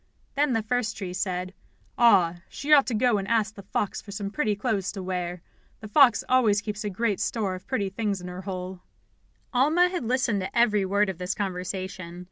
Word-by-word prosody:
Then 285 -2 +1
the 225 -2 0
first 225 0 -1
tree 185 -3 -5
said: 185 0 -3 0.4
"Ah, 185 -8 +5
she 295 +2 0
ought 280 -2 +6
to 245 - -1
go 230 -1 +3
and 195 - -5
ask 220 -1 +1
the 200 - -10
fox 195 +1 -2
for - - -16
some 200 0 -4
pretty 215 -5 0
clothes 205 -3 -1
to 195 -3 -6
wear. 180 -1 -4 0.4
The 215 - -8
fox 260 +2 +5
always 230 -5 +4
keeps 210 0 -5
a 210 - -2
great 205 +1 -1
store 210 -5 -1
of 185 0 -9
pretty 210 -7 -1
things 200 0 -2
in 180 - -8
her 180 +1 -7
hole." 185 -1 -6 0.7
Alma 310 +8 +4
had 360 -6 -3
listened 235 -4 0
to 185 - -5
every 210 -4 +3
word 200 +2 +2
of 185 -2 -5
this 180 +2 -2
conversation. 185 -2 -4
205 Hz, 205 wpm, -26 LUFS, 185-235 Hz, 0.7 s, ought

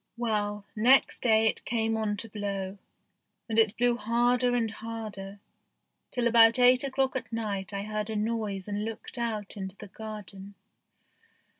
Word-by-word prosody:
Well, 210 -3 -1
next 250 +5 +4
day 220 -2 +4
it 220 - +1
came 225 -1 0
on 215 -2 -1
to 225 - -5
blow, 200 -2 -4 0.7
and 225 -1 +2
it 220 -1 +3
blew 245 0 +2
harder 245 +2 +2
and 225 -3 0
harder, 215 -3 -7 0.7
till 245 -1 -1
about 230 0 +6
eight 250 +1 +5
o'clock 265 -1 0
at 260 - -4
night 210 -3 -3
I 200 0 -3
heard 215 0 -3
a 220 - -3
noise 210 -3 -2
and 205 0 -2
looked 225 +2 -6
out 220 -4 -3
into 190 -1 -6
the 205 0 -11
garden. 205 -2 -9
220 Hz, 155 wpm, -28 LUFS, 205-235 Hz, 0.7 s, about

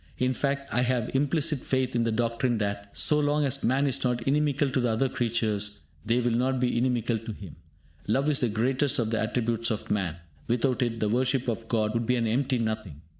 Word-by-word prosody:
In 130 +1 +1
fact, 140 +1 -2
I 125 - +2
have 125 -2 0
implicit 145 +2 +1
faith 130 -1 -1
in 115 -1 +2
the 115 - +1
doctrine 115 +1 0
that, 100 -1 -3
so 150 - +4
long 145 0 +2
as 135 - -1
man 130 +4 +2
is 135 -2 0
not 125 -2 0
inimical 145 +1 +1
to 130 - +1
the 120 -1 +1
other 115 +4 +1
creatures, 110 -4 -1 0.2
they 115 +3 +1
will 120 -1 +1
not 130 +3 +1
be 125 -1 +1
inimical 120 -2 +1
to 115 +1 -7
him. 95 -7 -11 0.5
Love 135 +7 +1
is 150 -2 +2
the 125 - +1
greatest 130 +5 +1
of 115 -2 0
the 110 - +1
attributes 115 +1 0
of 110 -3 -3
man. 95 -6 0 0.3
Without 125 +2 +1
it 115 -2 -1
the 105 - +2
worship 125 +2 +1
of 115 -1 -3
God 110 -2 0
would 115 -1 -1
be 125 - +3
an 120 -2 0
empty 130 +4 +1
nothing. 110 -9 -3
120 Hz, 220 wpm, -27 LUFS, 110-130 Hz, 0.5 s, so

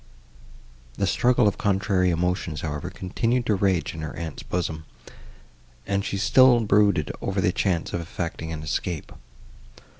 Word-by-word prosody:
The - - 0
struggle 125 -2 +3
of 100 - -1
contrary 95 -2 +1
emotions, 90 -2 -1
however, 75 +3 -4
continued 115 +7 -1
to 110 - +2
rage 95 -3 +1
in 80 - -7
her 80 - -5
aunt's 80 -3 -6
bosom, 80 -3 -3 1.0
and 100 0 0
she 100 - -3
still 120 +3 +5
brooded 100 -7 +3
over 100 0 -2
the 90 -1 +2
chance 90 -3 -1
of 85 - -1
effecting 85 -1 -5
an 80 -1 -5
escape. 80 +1 -3
90 Hz, 145 wpm, -25 LUFS, 80-100 Hz, 1.0 s, still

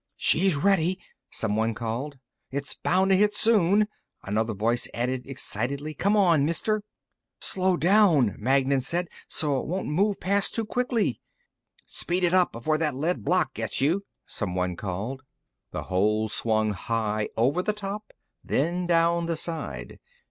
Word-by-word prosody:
"She's 185 -1 +3
ready," 185 +3 +2 0.3
someone 110 +1 -1
called. 120 +6 -4 0.3
"It's 140 +1 -3
bound 190 +2 +1
to - - +6
hit 210 +2 +3
soon," 210 -2 +4 0.4
another 110 +2 -1
voice 115 +4 +1
added 125 +2 -2
excitedly. 135 +3 -3
"Come 200 +8 +1
on, 170 -8 +4
Mister!" 205 +8 0 0.6
"Slow 185 -1 +2
down," 170 - +4
Magnan 135 +3 +2
said. 170 +6 -1 0.2
"So 145 -4 +1
it - - -8
won't 185 +4 -3
move 195 +6 +1
past 200 +2 +1
too 225 - -1
quickly." 245 0 -1 0.6
"Speed 180 +1 -2
it 175 0 +2
up, 185 -1 +4
before 155 +7 -1
that 150 -4 0
lead 160 +7 -1
block 175 +1 +1
gets 110 -1 -3
you," 165 +9 +1 0.2
someone 90 -3 -2
called. 105 +9 -4 0.5
The - - -5
hole 105 +4 +1
swung 110 -1 +1
high, 110 +1 -2
over 135 +10 +2
the 215 - 0
top, 210 0 -6 0.3
then 175 +5 0
down 170 0 +2
the 165 - -1
side. 145 - -4
155 Hz, 145 wpm, -26 LUFS, 115-185 Hz, 0.6 s, to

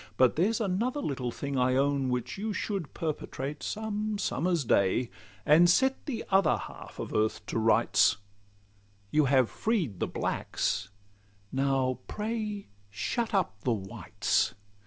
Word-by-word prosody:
But 130 -1 +4
there's 205 +8 +2
another 225 +7 0
little 130 - -2
thing, 140 +2 -3
I 125 0 +3
own, 140 -1 +2
Which 125 -1 -2
you 210 +2 -3
should 195 -8 -3
perpetrate 145 -3 -4
some 215 +3 -2
summer's 170 -4 0
day, 105 +4 +2 0.3
And 165 +4 +6
set 265 - +2
the 255 -6 -3
other 190 -5 +4
halt - - -10
of - - -5
earth 110 0 0
to - - -2
rights; 110 -2 +4 0.9
You 150 -1 +4
have 130 -2 +4
freed 170 - -1
the - - 0
blacks—now 100 +7 -2
pray 210 -1 -3 0.2
shut 220 - -2
up 100 - 0
the 125 - +2
whites. 100 -2 -1
140 Hz, 135 wpm, -29 LUFS, -, 0.9 s, And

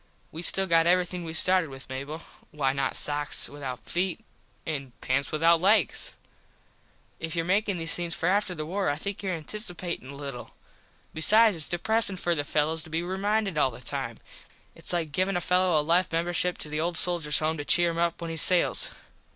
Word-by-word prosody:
We 160 - -7
still 190 +2 +5
got 165 -2 +3
everything 180 0 +1
we 160 -1 -6
started 180 0 +4
with 135 0 -11
Mable. 140 +5 -6 0.3
Why 135 -3 -1
not 135 0 -2
sox 145 0 0
without 130 -5 -7
feet 180 0 -1 0.5
and 135 -7 -5
pants 130 +1 -1
without 165 +2 +3
legs. 195 - +2 1.0
If 165 0 -5
your 165 -1 -1
makin 200 +1 +1
these 165 0 -1
things 175 -1 0
for - - -4
after 195 -1 +1
the 155 -1 -5
war 190 +1 -1
I 145 - 0
think 200 +7 -5
your 185 -4 -3
anticipatin 175 - -4
a 140 - -9
little. 140 -3 -8 0.6
Besides 215 +6 +5
its 160 -2 0
depresin 210 +2 +1
for 175 -1 0
the 145 -3 -2
fellos 155 +2 0
to 160 - -9
be 165 +2 -2
reminded 195 -1 -1
all 135 - +3
the 120 - -11
time. 125 -2 -5 0.6
Its - - 0
like 170 -4 -1
givin 185 +4 0
a - - -2
fello 180 -3 +2
a 150 - -2
life 170 +2 +2
membership 175 +2 -1
to 150 - -7
the 150 +1 -2
Old 170 0 -1
Soldiers 165 -5 +3
home 155 +1 +2
to 145 - -4
cheer 175 +3 +2
him 165 - -4
up 170 0 0
when 165 -1 -4
he 165 - -5
sails. 180 +2 +3
165 Hz, 200 wpm, -27 LUFS, 150-180 Hz, 1.0 s, still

